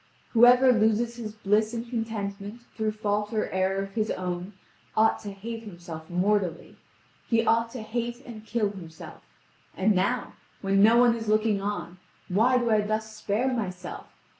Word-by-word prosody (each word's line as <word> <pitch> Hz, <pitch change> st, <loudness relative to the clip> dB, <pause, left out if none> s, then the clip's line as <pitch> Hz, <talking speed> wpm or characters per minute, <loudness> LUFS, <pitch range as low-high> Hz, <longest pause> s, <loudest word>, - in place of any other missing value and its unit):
Whoever 245 Hz, +2 st, +7 dB
loses 225 Hz, +1 st, +1 dB
his 220 Hz, -3 st, -6 dB
bliss 215 Hz, +2 st, +1 dB
and 235 Hz, +1 st, -4 dB
contentment 220 Hz, -2 st, -4 dB
through 215 Hz, -1 st, -1 dB
fault 210 Hz, -1 st, -1 dB
or 215 Hz, -, 0 dB
error 190 Hz, +1 st, 0 dB
of 195 Hz, -, -8 dB
his 215 Hz, 0 st, -1 dB
own 180 Hz, +1 st, -4 dB, 0.4 s
ought 220 Hz, +1 st, +4 dB
to 205 Hz, -, -7 dB
hate 225 Hz, +4 st, -7 dB
himself 170 Hz, -6 st, -9 dB
mortally. 185 Hz, -1 st, 0 dB, 0.5 s
He 230 Hz, -1 st, +2 dB
ought 230 Hz, 0 st, +2 dB
to 245 Hz, -4 st, -6 dB
hate 240 Hz, +3 st, -4 dB
and 220 Hz, -3 st, -9 dB
kill 220 Hz, -2 st, -1 dB
himself. 165 Hz, -5 st, -11 dB, 0.6 s
And 205 Hz, +3 st, +3 dB
now, 200 Hz, +7 st, 0 dB, 0.3 s
when 195 Hz, 0 st, +2 dB
no 225 Hz, +3 st, +6 dB
one 240 Hz, -1 st, +5 dB
is 225 Hz, -1 st, -6 dB
looking 215 Hz, -1 st, +2 dB
on, 200 Hz, -3 st, -4 dB, 0.3 s
why 230 Hz, +7 st, +3 dB
do 240 Hz, -2 st, +1 dB
I 215 Hz, -1 st, +4 dB
thus 215 Hz, +1 st, -3 dB
spare 215 Hz, +5 st, 0 dB
myself? 185 Hz, -6 st, -5 dB
215 Hz, 165 wpm, -27 LUFS, 195-230 Hz, 0.6 s, Whoever